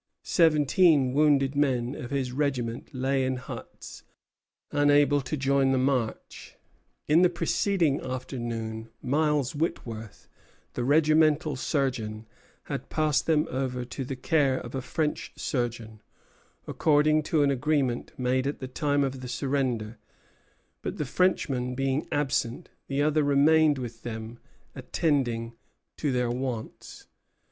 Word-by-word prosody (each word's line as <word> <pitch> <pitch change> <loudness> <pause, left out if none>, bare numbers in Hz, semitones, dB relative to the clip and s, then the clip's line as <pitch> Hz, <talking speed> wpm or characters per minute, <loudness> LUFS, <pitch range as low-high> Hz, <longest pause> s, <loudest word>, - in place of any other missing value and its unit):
Seventeen 155 -3 +4
wounded 140 -2 +3
men 130 -3 +1
of 120 - -7
his 135 -2 -2
regiment 125 -4 -2
lay 135 0 0
in 130 0 0
huts, 125 - -9 0.7
unable 145 0 +4
to 135 +4 -4
join 135 0 +2
the 135 - +2
march. 130 -3 -2 0.5
In 155 +3 +5
the 180 - +5
preceding 170 -3 +1
afternoon 115 -3 -5
Miles 150 -1 +1
Whitworth, 115 -8 -4 0.5
the 120 - -2
regimental 155 +1 +3
surgeon, 125 -6 -2 0.4
had - - -6
passed 155 -2 +1
them 155 -1 +2
over 125 -1 -2
to 130 +2 -5
the 130 +1 -5
care 135 0 +1
of 120 - -7
a 135 - -2
French 150 +3 -2
surgeon, 115 -4 -3 0.6
according 155 0 +3
to 155 0 +1
an 140 - +3
agreement 135 -2 0
made 130 +1 0
at 145 - -2
the 130 - -6
time 145 +1 0
of 135 -1 -3
the 125 - -6
surrender; 125 -5 -2 0.8
but, - - -4
the 150 - -2
Frenchman 130 -6 0
being 135 +2 -1
absent, 135 -5 -1 0.2
the 140 +1 0
other 155 0 +2
remained 145 +1 +4
with 120 -3 -7
them 110 0 -7 0.3
attending 120 -7 -1 0.4
to 145 - -1
their 125 -1 0
wants. 125 -3 -5
135 Hz, 130 wpm, -27 LUFS, 125-150 Hz, 0.8 s, In